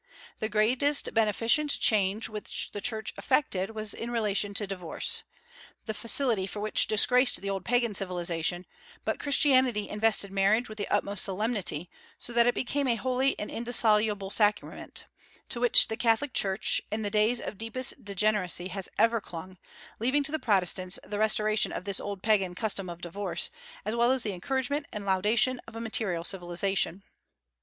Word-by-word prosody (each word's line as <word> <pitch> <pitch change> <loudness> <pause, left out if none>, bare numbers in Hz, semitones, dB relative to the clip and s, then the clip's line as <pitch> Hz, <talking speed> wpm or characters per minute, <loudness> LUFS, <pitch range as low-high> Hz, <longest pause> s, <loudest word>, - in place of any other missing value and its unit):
The 215 - -2
greatest 250 +7 +1
beneficent 230 +7 +2
change 205 0 +3
which 215 -1 -4
the 205 - -6
Church 220 -1 -2
effected 225 -7 0
was 215 -1 -2
in 235 - -6
relation 205 -3 -1
to 205 - 0
divorce, 185 -4 -2 0.6
the 220 - -3
facility 230 -3 +2
for 205 - -7
which 215 +1 +2
disgraced 250 +4 +4
the 200 0 -4
old 195 -2 -4
Pagan 240 -2 +1
civilization; 175 -2 -1 0.4
but - - -2
Christianity 260 -6 +2
invested 210 -2 +1
marriage 200 +5 +2
with 215 0 -10
the 205 - -3
utmost 200 -1 +1
solemnity, 195 -5 -1 0.3
so 240 - -6
that 235 0 +4
it 245 - +2
became 280 +2 -1
a 240 - +2
holy 255 +3 0
and 210 - -5
indissoluble 215 -4 +2
sacrament, 210 -1 -1 0.4
to 235 - -4
which 245 0 +5
the 220 - -4
Catholic 245 +4 +1
Church, 195 +1 +1
in 215 +1 -2
the 205 - -3
days 215 +3 +2
of 205 - -7
deepest 245 +3 -2
degeneracy 200 -3 0
has 195 0 -3
ever 230 0 +3
clung, 185 +1 -10 0.4
leaving 260 +6 +1
to 280 - -1
the 315 - -2
Protestants 185 - +1
the 205 +1 -5
restoration 215 0 +1
of - - -5
this 200 -1 +1
old 200 -2 -6
Pagan 195 -5 +1
custom 195 -3 -2
of 170 0 -9
divorce, 195 +4 -2 0.3
as 215 - -2
well 235 +1 +3
as 260 -1 +1
the 205 - -2
encouragement 265 +9 -2
and 210 -1 -6
laudation 215 +6 +2
of 230 - -12
a - - -5
material 220 -7 -2
civilization. 190 +1 0
215 Hz, 165 wpm, -28 LUFS, 195-235 Hz, 0.6 s, which